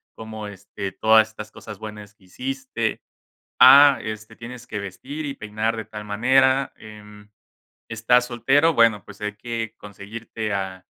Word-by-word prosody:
Cómo, 110 -1 -8
este, 100 0 -7
todas 110 +1 +4
estas 110 -1 -9
cosas 105 -3 -11
buenas 105 -1 -9
que 95 - -25
hiciste. 130 +7 -4 0.6
Ah, 140 +2 +8
este, 110 0 -7
tienes 120 +1 -10
que 105 - -5
vestir 130 +11 -7
y 140 - -4
peinar 110 0 -3
de 110 - -5
tal 105 -1 -9
manera. 130 +5 +2
Em. 105 -1 -14 0.6
¿Estás 120 +2 +2
soltero?, 135 +7 +2
bueno, 115 -4 +3
pues 100 -1 -14
hay 105 0 -4
que 115 -1 -5
conseguirte 105 +2 -7
a 95 -1 -4
110 Hz, 145 wpm, -23 LUFS, 105-125 Hz, 0.6 s, Ah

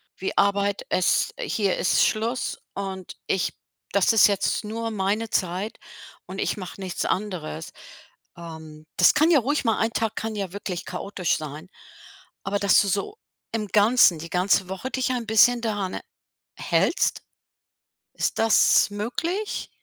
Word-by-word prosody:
wie 190 - -4
Arbeit, 200 0 +1
es 185 - +2
hier 215 - 0
ist - - +3
Schluss 230 +4 -1
und 190 -2 -6
ich 190 - 0 0.4
das 200 +1 +3
ist 225 - +7
jetzt 200 +1 0
nur 225 +2 -4
meine 210 +2 -1
Zeit 185 +3 -2 0.5
und - - -8
ich - - 0
mache 185 0 -8
nichts 185 -2 -3
anderes.“ 180 -5 -3 0.7
Ähm, 160 -2 -10
das - - +6
kann 310 +2 +4
ja 310 - +6
ruhig 280 +4 -1
mal 225 -1 +2
1 225 +1 +1
Tag 225 -2 -1
kann 220 0 -4
ja 195 -3 -4
wirklich 185 -3 -5
chaotisch 195 -3 -2
sein. 155 +3 -8 0.7
Aber, 200 +1 -1
dass 200 -1 +5
du 200 - -1
so 205 - -2 0.4
im 215 -2 -2
Ganzen, 210 -5 +5
die 165 +2 -8
ganze 185 +1 +1
Woche 190 +7 -5
dich 255 -1 0
ein 240 -3 -3
bisschen 235 +2 +5
daran, 205 -5 -2
äh, - - -5 0.5
hältst. - - +1 0.9
Ist - - -2
das 225 -2 +5
möglich? 325 - -3
200 Hz, 150 wpm, -24 LUFS, 185-225 Hz, 0.9 s, ist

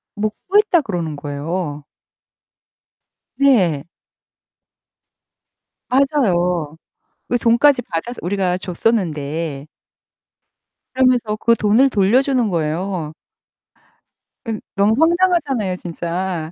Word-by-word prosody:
"못 210 0 -2
구했다." 400 -3 +4
그러는 175 - -4
거예요. 145 +2 -4 1.5
네. 185 - +3 2.0
맞아요. 180 - +1 0.5
그 245 - +2
돈까지 245 +3 +3
받아서 225 +7 -5
우리가 180 0 0
줬었는데. 165 -7 -2 1.3
그러면서 250 -4 +2
그 230 +2 +3
돈을 230 +6 +3
돌려주는 245 +3 +2
거예요. 165 0 -2 1.3
은 225 -2 -4
너무 205 +2 +3
황당하잖아요 320 - +2
진짜. 170 -1 -4
195 Hz, 195 characters per minute, -19 LUFS, 165-250 Hz, 2.0 s, 구했다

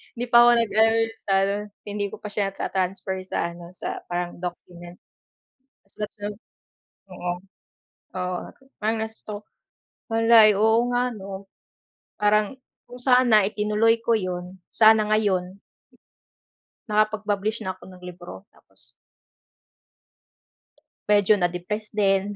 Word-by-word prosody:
hindi 240 - -3
pa 240 0 +8
ako - - +7
nag 230 -2 +1
ano 225 0 +5 0.2
sa 195 - -2
ano, 200 +1 0 0.3
hindi 205 -1 -3
ko - - -9
pa 210 - -5
siya 205 -2 0
na-ta-transfer 190 0 -2
sa 170 -2 -2
ano 170 0 -11
sa - - -5
parang 175 0 -4
document. 175 0 -8 1.0
Sulat 210 0 -6
lang 205 0 -3 0.8
oo, 180 -1 -4 0.9
oo 180 0 -2
ah - - -10 0.3
parang 220 +1 0
na-stuck 215 -1 -9 0.7
malay 225 -1 +6
oo 220 +2 +4
nga 245 0 0
'no? 195 -1 -8 0.7
Parang 210 +3 +2 0.3
kung 245 +1 -10
sana 245 -5 +4
itinuloy 215 +2 +1
ko 230 -1 +3
'yun, 180 0 -5
sana 220 -1 +5
ngayon 200 -3 0 1.3
nakapag-publish 215 0 0
na 190 -3 -4
ako 185 - -19
ng 185 - -14
libro 180 +2 -10
tapos - - -19 2.2
medyo 205 0 +4
na-depress 180 +5 -3
din 200 0 +1
205 Hz, 120 wpm, -24 LUFS, 185-220 Hz, 2.2 s, pa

